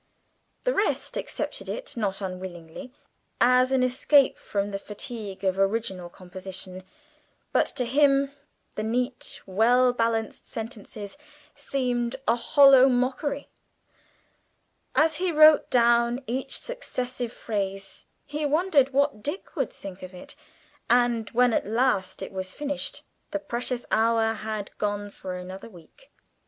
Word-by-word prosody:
The - - +1
rest 405 -1 0
accepted - - -4
it - - -5
not 205 -4 -2
unwillingly 185 +4 -7 0.5
as 250 +1 +5
an 260 -1 +3
escape 260 +2 +4
from 200 0 -3
the 195 - -3
fatigue 210 -2 -7
of 190 0 +1
original 195 -3 0
composition, 185 +1 -8 0.7
but - - +3
to 255 -3 -2
him 275 +2 +3 0.4
the - - -4
neat, 245 +3 -2
well 245 +6 +4
balanced 230 -2 -1
sentences 220 0 -7 0.3
seemed 250 -4 -1
a - - +4
hollow 270 +2 +7
mockery. 255 +3 -1 1.5
As 315 0 +4
he 365 0 0
wrote 310 -1 +7
down 235 +1 +3
each 260 +2 -2
successive 255 - -4
phrase, 195 -4 -4 0.2
he 300 +1 -4
wondered 295 -3 +3
what 280 -5 +1
Dick 295 - -5
would 270 -7 -1
think 190 -1 -9
of 185 0 -9
it, 180 - -9 0.5
and 240 -2 +3
when 245 0 +3
at - - 0
last 210 -5 +1
it - - -7
was 185 -1 -5
finished, 285 -2 -3 0.3
the 300 - -1
precious 245 -3 -3
hour 225 0 +3
had 215 -2 -5
gone 205 -1 -2
for 185 -2 -6
another 185 +4 -8
week! 180 - -18
235 Hz, 130 wpm, -26 LUFS, 200-270 Hz, 1.5 s, hollow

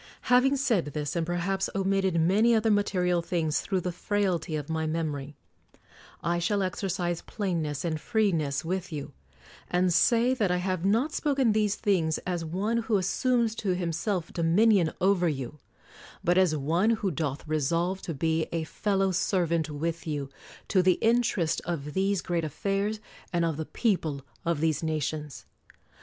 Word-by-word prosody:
Having 270 +3 +5
said 235 - +1
this, 145 0 -4
and 165 -1 -1
perhaps 185 +2 -1
omitted 195 -2 +1
many 210 +8 +4
other 220 0 +2
material 180 -4 +1
things 165 -3 -1
through 190 -2 -1
the 180 - -2
frailty 180 -4 -1
of 150 -2 -4
my 160 -1 -1
memory, 150 -3 -3 0.9
I 170 +1 +1
shall 200 +3 +1
exercise 180 -2 -2
plainness 165 -8 -3
and 155 -2 -2
freeness 165 -11 0
with 185 +2 -3
you; 145 -3 -6 0.6
and 180 0 +2
say 235 +8 +4
that 215 -7 0
I 180 - +2
have 185 -1 -2
not 230 +10 +2
spoken 275 -6 +2
these 210 -1 +1
things 175 -8 +1
as 175 -2 -2
one 195 +8 -1
who 225 -2 +1
assumes 230 +4 +1
to 190 -4 0
himself 175 +1 -2
dominion 175 +1 +3
over 185 -2 +3
you; 140 0 -5 0.6
but 175 - +3
as 185 -4 +4
one 165 +9 +1
who 215 -4 +1
doth 150 -1 -3
resolve 165 +5 0
to 165 - -5
be 160 +2 0
a 165 -1 -1
fellow 195 +3 0
servant 170 -3 0
with 165 +3 -3
you 145 -3 -3 0.4
to 190 - +4
the 180 0 +4
interest 220 -7 +1
of 150 -4 -4
these 195 0 +1
great 170 -2 -1
affairs 200 +7 -1 0.3
and 170 -2 +1
of 165 -2 -1
the 160 +1 -4
people 160 - -1 0.2
of 165 -3 0
these 160 -3 +1
nations. 155 -2 -3
175 Hz, 160 wpm, -28 LUFS, 160-200 Hz, 0.9 s, Having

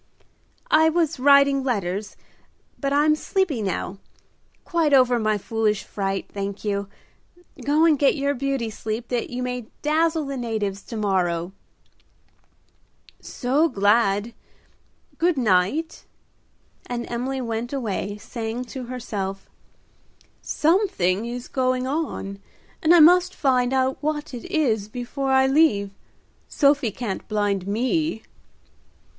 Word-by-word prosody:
"I 315 +1 +6
was 325 -3 0
writing 280 0 +5
letters, 205 -5 -2 0.6
but 275 -1 -1
I'm 295 +2 +4
sleepy 315 - -1
now. 195 -1 -3 0.7
Quite 325 -5 +2
over 250 -2 +4
my 215 -1 +1
foolish 215 0 -1
fright, 195 -1 -3
thank 200 +1 -5
you. 200 -1 -1 0.8
Go 300 +3 +3
and 310 -4 +4
get 280 - +4
your 280 -1 0
beauty 270 -4 -2
sleep 220 +3 -5
that 245 -2 -2
you 250 0 -4
may 250 -2 -4 0.2
dazzle 315 +1 +1
the 275 -1 -4
natives 215 -5 -3
to 230 - -6
morrow." 180 -4 0 1.7
"So 280 +6 0
glad, 205 0 +2 0.9
good 345 -2 +2
night;" 235 - +1 0.8
and 240 -1 -3
Emily 255 +3 -3
went 230 -1 -3
away, 205 -6 -3
saying 230 +3 -5
to 260 -2 -5
herself, 205 -6 -5 0.9
"Something 295 - +1
is 245 +1 -6
going 255 -1 0
on, 265 -9 -3 0.4
and 325 +2 +5
I 335 - +7
must 360 +3 +6
find 255 -3 +2
out 265 0 +1
what 300 -1 -3
it 240 - -7
is 270 - 0
before 250 +4 -4
I 265 0 +5
leave. 265 -9 +3 0.6
Sophie 280 -4 +2
can't 210 -2 -5
blind 205 -3 -1
me." 255 +5 -1
250 Hz, 120 wpm, -23 LUFS, 210-285 Hz, 1.7 s, I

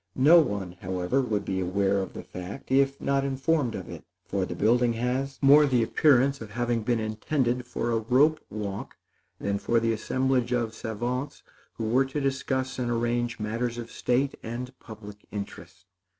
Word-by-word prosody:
No 155 +6 +7
one, 100 - -2
however, 90 +8 0
would 110 -5 -1
be 95 -1 -1
aware 100 +2 +1
of 95 - -4
the - - -7
fact 90 +8 -8
if 135 +1 +3
not 140 0 +1
informed 135 -2 0
of 95 - -6
it; - - -9 0.2
for 95 -2 -1
the 85 - -5
building 120 +5 +3
has 130 +4 -2
more 145 +2 +7
the 125 -4 +3
appearance 140 +1 +3
of 110 - -7
having 120 +1 -1
been 115 +1 0
intended 120 +3 -1
for 120 -1 -2
a 115 - +2
rope 135 +8 +3
walk 100 -2 -5 0.4
than 100 0 -1
for 115 +3 +2
the 115 0 +1
assemblage 125 +2 0
of 115 -2 0
savants 120 +5 -4 0.3
who - - -4
were 130 +4 +3
to 135 +3 -3
discuss 130 -1 -1
and 120 -1 -1
arrange 120 0 -1
matters 115 +3 -2
of 115 -1 -7
state 130 +3 0
and 125 +3 -5
public 105 -3 -11
interest. 100 -3 -8
120 Hz, 175 wpm, -27 LUFS, 105-130 Hz, 0.4 s, No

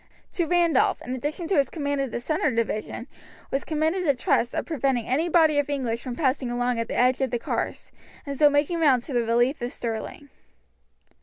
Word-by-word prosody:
To 345 -3 0
Randolph, 340 -5 +3
in 250 - -4
addition 295 +6 -4
to 380 - +2
his 275 - +2
command 285 -3 -2
of 270 - -2
the 235 - -4
centre 310 +6 0
division, 230 -3 -2 0.5
was 270 - -1
committed 320 +4 0
the 285 -5 +2
trust 245 0 +1
of - - -1
preventing 270 -6 0
any 310 +7 0
body 315 -3 +4
of 290 - -1
English 245 -5 -2
from 250 -2 -5
passing 260 -2 0
along 245 0 0
at 230 - -2
the - - -4
edge 255 +2 +3
of 265 - +1
the 240 - -1
carse, - - -4 0.3
and 280 -1 -4
so 295 +1 +6
making 290 +4 +1
round 270 -7 +4
to 280 - -7
the 240 - +2
relief 240 +5 +1
of 240 +1 -3
Stirling. 230 +5 -5
275 Hz, 210 wpm, -25 LUFS, 245-305 Hz, 0.5 s, so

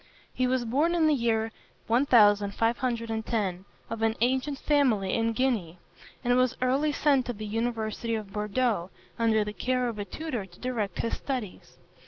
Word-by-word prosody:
He 255 - +1
was 250 -1 0
born 295 +9 +1
in 330 -2 +3
the 310 - +4
year 225 -4 0 0.3
1510, 225 -3 +2 0.2
of 225 -1 -5
an 225 0 +2
ancient 260 +4 +1
family 255 -11 +2
in 230 0 +1
Guienne, 225 -9 0 0.5
and 245 0 +3
was 255 0 +2
early 270 +4 +2
sent 285 -3 +2
to 245 - -2
the 215 -1 -7
university 225 +1 -2
of 210 -3 -6
Bordeaux, 210 -3 0 0.3
under 220 -2 +3
the 210 0 -5
care 250 +2 0
of 225 -3 -4
a 205 - -3
tutor 250 -7 -5
to 175 -1 -19
direct 225 -7 -3
his 230 - -1
studies. 250 -8 -5
230 Hz, 160 wpm, -28 LUFS, 215-255 Hz, 0.5 s, the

